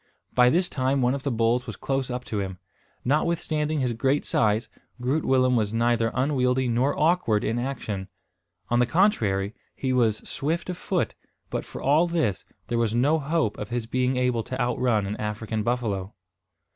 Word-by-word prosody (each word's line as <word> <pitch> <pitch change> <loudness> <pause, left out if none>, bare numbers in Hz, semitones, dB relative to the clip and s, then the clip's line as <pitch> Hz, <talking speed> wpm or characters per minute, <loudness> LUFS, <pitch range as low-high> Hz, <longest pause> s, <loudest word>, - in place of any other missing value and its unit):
By 125 0 +6
this 175 +6 +2
time 130 0 0
one 125 +1 +3
of 140 - -3
the 140 - -1
bulls 120 +1 +1
was 110 - -5
close 135 +5 -2
up 125 0 -4
to 105 - -3
him. 95 -2 -4 0.5
Notwithstanding 155 +1 0
his 125 -2 0
great 135 +5 +1
size, 110 +1 +1 0.3
Groot 135 +6 0
Willem 130 -1 +3
was 110 -1 0
neither 115 -1 +2
unwieldy 130 -2 +1
nor 125 +4 +1
awkward 155 -10 +2
in 115 +2 0
action. 110 -7 -4 0.6
On 120 - +2
the 125 - +3
contrary, 110 - +2 0.2
he 130 -1 -1
was 115 -4 +1
swift 165 +5 -2
of 180 - -6
foot; - - -1 0.4
but, - - -2
for - - -9
all 150 +6 +4
this, 155 - 0 0.2
there 120 -1 -1
was 115 -1 +1
no 145 +7 +3
hope 150 -6 0
of 105 - -5
his 120 -1 -2
being 125 +2 0
able 125 -2 +1
to 130 +3 -6
outrun 120 -3 +1
an 100 +2 -3
African 110 +1 -3
buffalo. 110 -3 -2
125 Hz, 180 wpm, -25 LUFS, 115-140 Hz, 0.6 s, By